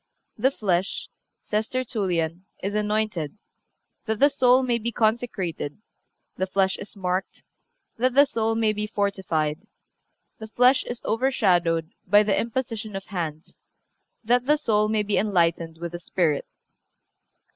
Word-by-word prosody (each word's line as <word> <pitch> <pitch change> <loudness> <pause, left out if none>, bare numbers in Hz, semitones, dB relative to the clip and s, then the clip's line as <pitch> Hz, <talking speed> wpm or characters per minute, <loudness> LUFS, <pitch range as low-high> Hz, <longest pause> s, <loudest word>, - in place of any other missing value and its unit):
"The 250 +5 +3
flesh," 195 -7 -1 0.3
says 215 +1 -1
Tertullian, 190 -9 -2 0.2
"is 200 +1 -2
anointed, 210 -5 -1 0.7
that 220 -2 -1
the 285 - +6
soul 260 -1 +4
may 240 -2 +1
be 235 +2 -2
consecrated; 215 -10 -1 0.6
the 190 - -1
flesh 190 0 +1
is 205 - -9
marked, 185 -1 -3 0.6
that 255 +1 +2
the 285 +1 +8
soul 225 -4 -1
may 220 -1 +2
be 210 0 -3
fortified; 190 -5 -1 0.7
the 220 - -7
flesh 250 +4 +4
is 240 -1 -6
overshadowed 180 -10 +1 0.2
by 205 +3 +6
the 205 -1 +1
imposition 225 -3 -3
of 195 - -5
hands, 165 -5 -5 0.6
that 245 +3 +2
the 300 +1 +5
soul 215 -7 +2
may 215 -1 +1
be 210 0 +1
enlightened 170 -5 +1
with 170 0 -5
the 175 - -6
Spirit." 165 -4 0
210 Hz, 135 wpm, -25 LUFS, 180-230 Hz, 0.7 s, the